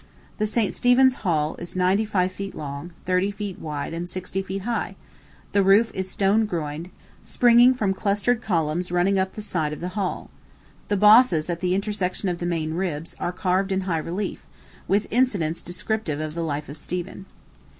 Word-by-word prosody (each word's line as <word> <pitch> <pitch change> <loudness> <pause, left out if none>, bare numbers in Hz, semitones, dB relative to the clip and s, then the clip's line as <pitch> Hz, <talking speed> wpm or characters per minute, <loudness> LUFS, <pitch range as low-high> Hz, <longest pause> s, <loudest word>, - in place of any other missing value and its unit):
The 215 - +1
St. 215 -1 0
Stephen's 255 +1 +4
Hall 155 -6 0
is 175 +1 -8
ninety 185 +4 +2
five 185 -3 0
feet 195 +1 -6
long, 140 +3 -6
thirty 185 +2 +2
feet 205 -2 -6
wide, 150 -2 -4
and 170 +1 -4
sixty 185 +1 -4
feet 195 0 -5
high; 235 +1 -2 0.6
the 200 - +3
roof 200 +4 +5
is 190 0 -3
stone 205 +3 +2
groined, 160 -2 -4 0.3
springing 245 +1 +5
from 205 -6 0
clustered 205 +5 0
columns 170 -3 -1
running 185 +2 +2
up 190 0 -1
the 215 - -6
side 160 -7 0
of - - -7
the 180 - -4
hall. 190 -1 -3 0.6
The 205 - +1
bosses, 210 -6 +6
at 170 - -3
the 180 0 +1
intersections 195 -2 -1
of 170 - -5
the 175 - -2
main 160 -2 -1
ribs, 165 -3 -3
are 175 - -1
carved 185 +1 0
in 190 0 +1
high 175 -4 -1
relief, 180 +5 -4 0.4
with 200 +2 +2
incidents 200 -10 +1
descriptive 175 -3 -3
of 155 0 -4
the 170 - -3
life 150 -2 -3
of 145 - -9
Stephen. 180 +4 -5
185 Hz, 180 wpm, -24 LUFS, 170-205 Hz, 0.6 s, bosses